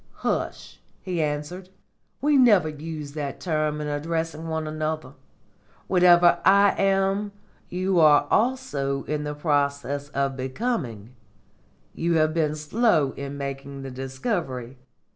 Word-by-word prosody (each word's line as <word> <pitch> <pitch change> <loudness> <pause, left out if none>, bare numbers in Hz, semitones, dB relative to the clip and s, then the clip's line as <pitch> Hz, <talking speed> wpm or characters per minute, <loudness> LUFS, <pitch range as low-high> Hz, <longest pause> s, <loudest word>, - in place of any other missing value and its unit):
"Hush!" - - -3 0.2
he 180 -3 -2
answered; 150 +5 -3 0.5
"we 295 +1 +3
never 215 - +5
use 155 -1 -7
that 145 -2 -5
term 155 -3 -1
in 150 - -3
addressing 160 +2 -3
one 160 -1 -2
another. 155 0 -3 0.7
Whatever 175 -1 +5
I 200 +1 +6
am, 195 +1 +1 0.4
you 185 0 0
are 150 -2 +6
also 210 - 0
in 150 -1 -3
process 145 -1 -1
of 140 -2 -1
becoming. 130 - -3 0.8
You 170 +1 0
have 155 -1 +2
been 155 -2 0
slow 155 - +2
in 140 +1 -7
making 140 0 -6
the 135 - -6
discovery. 130 - -4
155 Hz, 120 wpm, -25 LUFS, 140-180 Hz, 0.8 s, I